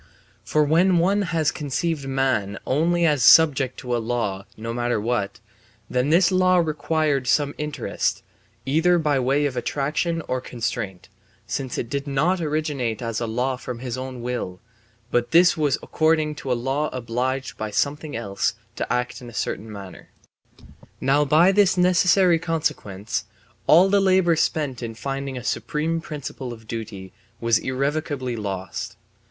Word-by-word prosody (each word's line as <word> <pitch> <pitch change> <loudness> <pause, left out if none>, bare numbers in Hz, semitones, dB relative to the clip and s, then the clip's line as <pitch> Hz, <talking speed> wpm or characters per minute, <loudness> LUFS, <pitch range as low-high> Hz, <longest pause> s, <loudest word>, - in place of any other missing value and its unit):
For 155 - +2
when 170 +5 +3
one 195 +5 +3
has 165 -4 +1
conceived 150 0 -2
man 130 -7 0
only 170 +5 +2
as 150 -5 +2
subject 140 -4 +6
to 125 -3 -2
a - - 0
law 110 -5 -2
(no 115 +1 -4
matter 120 -1 0
what), 110 -2 -2 0.5
then 125 +3 +1
this 175 +3 +4
law 185 0 +4
required 155 -4 0
some 145 +2 +2
interest, 150 0 -2 0.4
either 165 +6 +3
by 150 -4 +1
way 135 +3 +2
of 135 -3 -2
attraction 150 +6 -1
or 130 0 -1
constraint, 110 -7 -4 0.4
since 130 -2 -4
it - - -2
did 140 +3 -3
not 160 +7 +1
originate 150 -7 -1
as 115 -1 -2
a 115 - -1
law 125 +3 -1
from 125 -1 -6
his 125 0 -4
own 130 -2 -6
will, 120 -7 -4 0.5
but 120 0 +1
this 170 +1 +5
will 155 - 0
was 140 - +2
according 155 -1 +1
to 135 -3 -5
a 125 - +2
law 135 +5 -1
obliged 130 +2 -3
by 110 - -4
something 145 +7 -1
else 100 -2 -1 0.2
to - - -3
act 125 0 -1
in 120 - -9
a - - -13
certain 110 +1 -3
manner. 100 -3 -10 0.9
Now 145 +2 +3
by 160 +6 +5
this 195 -2 +3
necessary 180 -1 +4
consequence 110 - -2 0.4
all 175 +5 +7
the 200 0 +3
labour 185 -3 +4
spent 145 -5 -1
in 115 -2 -5
finding 135 +2 -4
a 125 - -6
supreme 160 +5 -1
principle 140 -5 -6
of 110 -1 -14
duty 105 -5 -6 0.3
was 115 -1 +2
irrevocably 135 -1 -2
lost. 95 -3 -5
135 Hz, 160 wpm, -23 LUFS, 120-160 Hz, 0.9 s, all